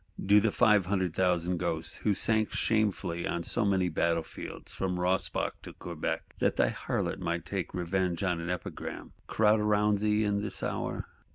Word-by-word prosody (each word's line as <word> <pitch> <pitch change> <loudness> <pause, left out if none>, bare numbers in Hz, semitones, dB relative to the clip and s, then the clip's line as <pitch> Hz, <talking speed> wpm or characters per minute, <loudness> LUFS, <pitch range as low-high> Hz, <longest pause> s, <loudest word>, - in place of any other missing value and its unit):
Do 100 +2 +7
the 110 +2 +2
"five 105 -6 +4
hundred 95 -4 0
thousand" 90 -1 +1
ghosts, 85 -2 -2
who 105 -2 +1
sank 110 +1 +2
shamefully 100 -6 0
on 85 0 -2
so 115 - 0
many 95 -3 +2
battle 85 0 +1
fields - - -9
from 90 -1 -2
Rossbach 90 +1 0
to - - -10
Quebec, 85 -3 -5
that - - +2
thy - - +3
Harlot - - -2
might 85 +1 -2
take 95 -2 -3
revenge 90 0 -1
for - - 0
an 85 -1 -2
epigram,—crowd 105 +4 -1
round 105 -1 +2
thee 105 +1 +2
in 100 -1 +1
this 105 -2 -5
hour? - - -3
95 Hz, 170 wpm, -30 LUFS, 85-105 Hz, -, Do